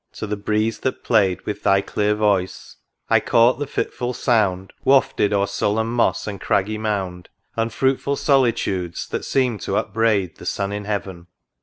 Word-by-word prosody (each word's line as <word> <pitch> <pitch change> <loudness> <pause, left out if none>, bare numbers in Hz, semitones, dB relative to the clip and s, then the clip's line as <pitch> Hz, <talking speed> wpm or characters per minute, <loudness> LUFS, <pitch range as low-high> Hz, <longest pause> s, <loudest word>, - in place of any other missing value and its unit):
to - - -6
the 105 0 -2
breeze 110 +2 -1
that 130 - -3
play'd 100 -6 +2
With 105 0 -5
thy 100 -1 +4
clear 105 +1 0
voice, 100 -3 -1 0.3
I - - +4
caught 120 +3 +3
the 145 - -3
fitful 125 -2 -3
sound 95 -6 +1
Wafted 130 -6 +3
o'er 100 -1 +2
sullen 105 +2 0
moss 120 0 +1
and 100 -2 -6
craggy 105 +2 0
mound, 95 -5 -3 0.3
Unfruitful 130 +5 0
solitudes, 120 - 0
that - - -3
seem'd 125 -7 0
to - - -1
upbraid 105 -5 0
The - - -9
sun 100 0 -2
in 105 0 -5
heaven 95 -4 -4
105 Hz, 160 wpm, -21 LUFS, 100-115 Hz, 0.3 s, thy